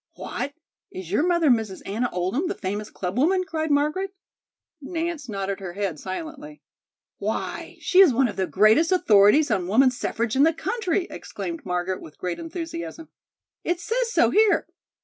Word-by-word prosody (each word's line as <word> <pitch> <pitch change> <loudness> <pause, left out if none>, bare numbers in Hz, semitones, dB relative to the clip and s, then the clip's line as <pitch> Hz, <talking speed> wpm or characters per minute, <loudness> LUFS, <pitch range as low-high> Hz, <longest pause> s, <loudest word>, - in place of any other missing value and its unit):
"What, 285 - -5 0.3
is 185 -2 -8
your 210 - +2
mother 340 -5 +3
Mrs. 220 -5 -1
Anna 230 +5 -1
Oldham, 190 - -1
the 385 - -2
famous 205 - -4
clubwoman?" 280 - 0
cried 315 -3 -2
Margaret. 305 +7 0 0.7
Nance 325 -2 -4
nodded 195 -1 -3
her 185 -3 -6
head 195 -5 -3
silently. 300 - -7 0.6
"Why, - - -4
she 375 - +3
is 380 -7 +8
one 255 +2 +3
of 210 - -6
the 190 -1 -1
greatest 220 - +4
authorities 230 - +5
on 185 -4 0
women's 255 +5 +3
suffrage 230 0 -1
in 270 - +3
the 320 +3 +5
country!" 375 0 -1
exclaimed 335 -3 -6
Margaret 180 +1 -2
with 155 - -12
great 180 -1 -4
enthusiasm. 330 -1 -6 0.5
"It 350 0 -1
says 465 +5 -1
so - - +3
here. 430 -1 +4
280 Hz, 160 wpm, -24 LUFS, 200-335 Hz, 0.7 s, is